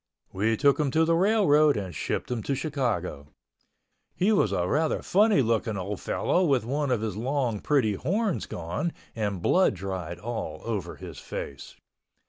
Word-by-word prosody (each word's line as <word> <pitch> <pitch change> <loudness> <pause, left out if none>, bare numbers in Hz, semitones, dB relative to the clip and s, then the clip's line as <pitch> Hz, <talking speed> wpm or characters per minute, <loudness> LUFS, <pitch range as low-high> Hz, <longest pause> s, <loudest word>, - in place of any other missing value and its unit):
We 110 +4 +1
took 140 +2 +3
him 150 -2 +2
to 160 - +5
the 165 - +2
railroad 165 - +4
and 95 -3 -4
shipped 75 - -3
him 120 -2 -1
to 140 - -1
Chicago. 125 - -2 0.9
He 195 +4 +2
was 195 - +3
a 90 -2 0
rather 155 - 0
funny 205 -5 +4
looking 110 -2 0
old 95 +1 -4
fellow 180 - +1
with 135 -9 +2
one 140 +3 -1
of 125 -4 +1
his 110 -3 -3
long 125 -1 -1
pretty 130 -7 +2
horns 190 - -1
gone 90 - -3 0.2
and 100 -5 -2
blood 185 - +3
dried 90 -2 -5
all 90 -7 -5
over 110 -6 -3
his - - -9
face. 70 0 -7
120 Hz, 165 wpm, -27 LUFS, 100-150 Hz, 0.9 s, to